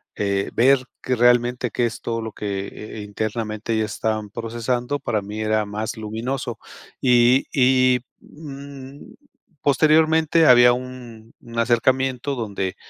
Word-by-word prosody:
eh, 100 -1 -1
ver 135 +3 +4 0.2
realmente 120 -1 +2
que 120 - 0
es 115 - -4
todo 115 -1 -3
lo 110 -1 -5
que, 100 -2 -4
eh, 110 0 -9
internamente 110 +2 -4
ellas 110 -1 -1
estaban 110 -2 -2
procesando 120 +5 -3
para 110 -3 -2
mí 105 +2 -6
era 110 0 +1
más 105 +2 -5
luminoso. 115 +3 -4 0.4
Y 125 +1 +4
y, 130 -1 +4 0.2
mm, 140 -2 -11 0.5
posteriormente 155 +3 +3
había 120 -2 +7
un 120 -3 -9
un 115 0 -6
acercamiento 130 +3 +1
donde, 100 -5 -3
120 Hz, 125 wpm, -22 LUFS, 110-130 Hz, 0.5 s, había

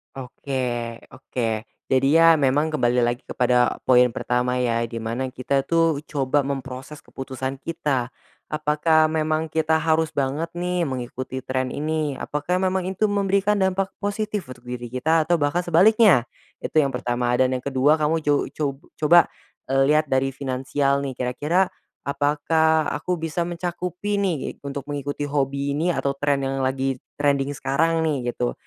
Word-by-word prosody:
Oke 135 +1 -7 0.6
oke. 115 -3 -3 0.2
Jadi 130 +1 +3
ya, 165 -1 +6
memang 145 +3 +2
kembali 125 -4 +2
lagi 120 +1 0
kepada 125 0 +2
poin 125 -1 +5
pertama 125 0 0
ya, 115 -2 0
di 115 - -9
mana 115 +4 -3
kita 130 +2 -1
tuh 165 -3 +2
coba 140 0 +1
memproses 135 +2 -6
keputusan 130 0 -6
kita, 135 -6 -1 0.4
apakah 155 +1 +2
memang 155 0 -1
kita 160 0 +2
harus 160 0 +1
banget 140 +4 -1
nih 175 -1 -1
mengikuti 130 0 -5
tren 130 0 -1
ini? 155 0 -2
Apakah 150 +6 -2
memang 185 -1 0
itu 190 +3 0
memberikan 200 +1 +1
dampak 190 +1 0
positif 210 -2 -3
untuk 125 -1 -11
diri 125 -1 -5
kita, 155 +6 +1
atau 175 - +4
bahkan 150 +3 +1
sebaliknya? 185 - +5 0.4
Itu 155 - +2
yang 135 -4 +1
pertama. 120 0 0
Dan 130 0 +2
yang 130 -1 -2
kedua 140 +3 +2
kamu 155 +1 +1
co 145 -1 +2
co 155 - -1 0.3
coba, 170 +3 +6 0.4
eee, 135 +1 +3
lihat 155 0 +3
dari 135 0 +1
finansial 135 +1 -1
nih, 135 - -3
kira-kira 145 +10 0 0.4
apakah 155 +2 +2
aku 180 +4 -2
bisa 165 +1 -3
mencakupi 180 +4 -3
ni 190 -3 +1 0.3
untuk 140 -1 -6
mengikuti 145 0 -4
hobi 140 0 -1
ini 160 +5 0
atau 140 -5 0
tren 140 0 0
yang 135 0 -2
lagi 130 0 -1 0.2
trending 140 -1 +1
sekarang 165 +4 +1
nih, 135 -6 -1
gitu. 125 - -1
145 Hz, 155 wpm, -23 LUFS, 130-160 Hz, 0.6 s, ya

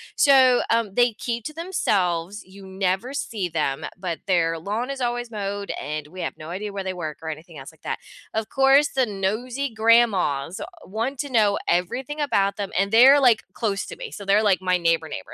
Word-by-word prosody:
So, 260 -3 +5
um, 230 -3 +1
they 240 +1 +3
keep 235 +1 -4
to 305 - -5
themselves, 200 - -1
you 190 +1 -13
never 190 +7 -2
see 210 -9 -3
them, 150 -4 -1
but 180 -3 -4
their 165 -3 +1
lawn 215 +9 -3
is 275 -1 -6
always 240 -1 -2
mowed, 200 -1 -4
and 150 0 -4
we 185 +2 -8
have - - -4
no 155 +2 -9
idea 205 +3 -4
where 200 -1 -4
they 190 0 -3
work 160 -4 -5
or 160 - -4
anything 160 +1 -8
else 135 +2 -10
like 160 - -26
that. - - -3 0.3
Of 220 0 -3
course, 270 +2 +4
the 260 -2 +1
nosy 230 +7 -2
grandmas 220 -9 +2 0.2
want 230 +8 -3
to 285 - -6
know 210 -4 +3
everything 255 - -1
about 200 -9 +1
them, 200 -2 -4
and 195 +1 +1
they're, 260 +5 +8
like, 245 -5 +4
close 205 -3 -2
to - - -8
me, - - -8
so 205 - -8
they're, 200 +2 +3
like, 195 -3 +3
my 185 -1 +2
neighbor 165 -2 +1
neighbor, 95 - -7
200 Hz, 205 wpm, -23 LUFS, 180-245 Hz, 0.3 s, they're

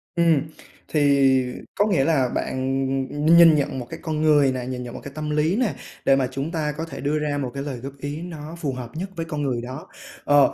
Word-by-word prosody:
Ừm, 165 -4 +4 0.5
thì 150 - 0 0.7
có 205 - +3
nghĩa 180 -10 +2
là 135 -4 +2
bạn, 135 +2 -1 0.2
ừm, 145 +2 -3
nhìn 165 -2 +8
nhận 140 -2 -1
một 125 - -5
cái - - -7
con 155 -3 -2
người 145 -3 +5
nè, 130 -1 -4
nhìn 125 0 -4
nhận 120 -1 -7
một - - -7
cái 140 - -8
tâm 155 0 -4
lý 150 +4 +1
nè, 225 - +1 0.3
để 135 - +6
mà 135 -2 +1
chúng 135 +4 -3
ta 155 -3 -1
có 165 - -3
thể 140 -4 -8
đưa 150 +2 0
ra 150 -1 -1
một 135 -3 -3
cái 140 - -4
lời 140 -3 -4
góp 135 +3 -7
ý 145 +3 -5
nó 160 -2 -7
phù 145 -5 -2
hợp 125 -2 -6
nhất 185 +5 -4
với 165 -1 -3
con 155 -2 -4
người 130 -4 -1
đó. 130 +5 -7 0.4
Ờ, 145 -1 +5
145 Hz, 245 wpm, -23 LUFS, 135-160 Hz, 0.7 s, nhìn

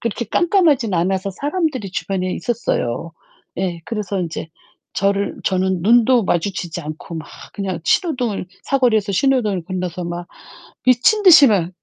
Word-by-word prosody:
빛이 230 -1 -3
깜깜하진 320 - +2
않아서 190 +3 0
사람들이 290 - -2
주변에 185 -1 -2
있었어요. 170 - -2 0.5
예. 175 -2 -2
그래서 210 -4 -3
인제 165 -2 -5 0.5
저를 200 0 0
저는 185 -1 0
눈도 235 +3 +4
마주치지 175 -1 -2
않고 160 +2 -7
막 160 - -7 0.2
그냥 190 -4 -4
신호등을 245 - 0 0.2
사거리에서 225 -7 +1
신호등을 215 -6 +1
건너서 180 -1 -4
막 175 0 -5 0.6
미친 255 - +4
듯이 340 -7 +9
막 190 -7 +1
200 Hz, 320 characters per minute, -19 LUFS, 180-245 Hz, 0.6 s, 듯이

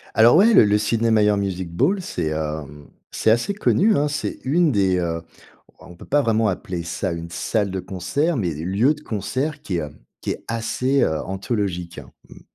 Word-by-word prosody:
Alors 115 +5 +6
ouais, 225 +5 +6
le 110 - +7
le 105 0 +3
Sydney 115 +1 +1
Myer 105 -1 +3
Music 95 -3 -3
Bowl, 190 - +1
c'est, 90 - -3
hem, 75 -2 -5 0.2
c'est - - +1
assez 120 - +1
connu, 210 +1 +2
hein. 145 +1 +2
C'est 145 - -4
une 155 +3 +2
des, 95 -4 +2
heu 85 -1 -2 0.6
on 85 - -14
peut - - -12
pas 145 +1 +2
vraiment 115 -3 +2
appeler 90 -2 -3
ça 85 +2 -3
une 85 0 -6
salle 100 +2 -1
de 95 0 -3
concert, 140 - -1
mais 90 -8 -1
des 75 +2 -6
lieux 105 - +2
de 150 - -14
concert 130 +5 -3
qui, 90 -3 -2
heu, 75 - -5 0.3
qui - - -4
est - - -10
assez, 115 +4 0
heu, 80 -1 +1
anthologique. 95 -4 -3 0.3
Mmh. - - -14
105 Hz, 195 wpm, -22 LUFS, 85-130 Hz, 0.6 s, le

